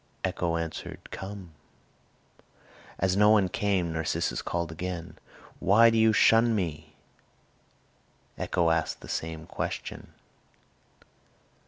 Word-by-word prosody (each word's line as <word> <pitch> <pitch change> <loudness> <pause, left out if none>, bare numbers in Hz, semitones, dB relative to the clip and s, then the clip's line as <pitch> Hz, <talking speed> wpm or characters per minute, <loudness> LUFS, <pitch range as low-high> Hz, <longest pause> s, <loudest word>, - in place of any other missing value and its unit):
Echo 85 -1 -1
answered, 85 -1 -6
"Come." 95 -3 -7 1.5
As 95 0 +1
no 105 +1 +5
one 105 -4 +4
came, 95 -4 0
Narcissus 80 -1 -1
called 85 -1 -3
again, 85 +1 -6 0.4
"Why 115 +5 +6
do 115 - +1
you 110 0 +5
shun 115 +2 +4
me?" 80 -5 -4 1.4
Echo 85 -1 +1
asked 80 -2 -1
the - - -11
same 80 0 -4
question. - - -5
90 Hz, 105 wpm, -28 LUFS, 80-105 Hz, 1.5 s, Why